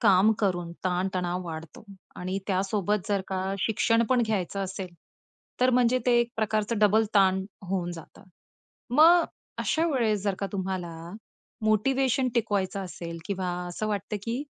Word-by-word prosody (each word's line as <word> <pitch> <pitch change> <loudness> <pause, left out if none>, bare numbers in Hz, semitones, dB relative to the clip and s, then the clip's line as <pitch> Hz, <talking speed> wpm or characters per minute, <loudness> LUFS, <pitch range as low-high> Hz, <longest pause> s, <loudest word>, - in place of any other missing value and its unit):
काम 195 +3 +5
करून 175 -4 0
ताण-तणाव 180 0 -1
वाढतो 160 +1 -8 0.3
आणि 185 +2 -3
त्यासोबत 195 0 0
जर 200 -1 +1
का 190 0 -2
शिक्षण 230 +2 +2
पण 250 -2 +4
घ्यायचं 200 -2 -1
असेल, 190 0 -5 0.7
तर 255 - +5
म्हणजे 250 0 +3
ते 240 -1 +5
एक 235 0 -1
प्रकारचं 215 0 0
डबल 215 +1 +4
ताण 190 -1 +4 0.3
होऊन 175 -2 -1
जातं. 165 -2 -12 0.7
मग 335 +4 +7 0.3
अशा 330 -1 +1
वेळेस 225 - +1
जर 200 -2 0
का 200 - -2
तुम्हाला 185 -3 -3 0.7
मोटिव्हेशन 260 +4 +2
टिकवायचं 200 -4 0
असेल 170 -2 -7
किंवा 190 -2 -2 0.2
असं 215 +5 -3
वाटतं, 205 0 -2
की 235 +5 -2
200 Hz, 140 wpm, -27 LUFS, 185-230 Hz, 0.7 s, मग